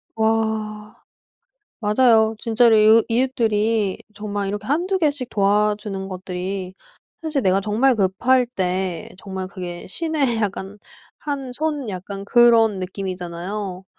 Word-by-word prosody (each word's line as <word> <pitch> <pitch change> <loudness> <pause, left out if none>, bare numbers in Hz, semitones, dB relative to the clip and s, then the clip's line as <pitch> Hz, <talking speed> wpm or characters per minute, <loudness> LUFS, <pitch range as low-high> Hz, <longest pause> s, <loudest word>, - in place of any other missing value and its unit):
아. 220 -1 -1 0.9
맞아요. 220 0 +4
진짜로 230 0 +4
이웃 215 +1 +6
이웃들이 225 -4 +1 0.2
정말 205 -1 -3
이렇게 205 +2 -4
한두 355 +7 +1
개씩 285 -7 0
도와주는 205 -1 0
것들이 185 0 -5 0.5
사실 305 -4 -1
내가 190 +1 +3
정말 225 +5 +2
급할 240 +6 +2
때 185 -6 -2
정말 190 -1 -6
그게 180 -3 -7
신의 290 - -1
약간 200 0 -3 0.4
한 275 -4 -4
손 295 -2 -2
약간 195 +1 -6
그런 225 -2 +5
느낌이잖아요. 185 +1 -5
210 Hz, 250 characters per minute, -21 LUFS, 190-240 Hz, 0.9 s, 이웃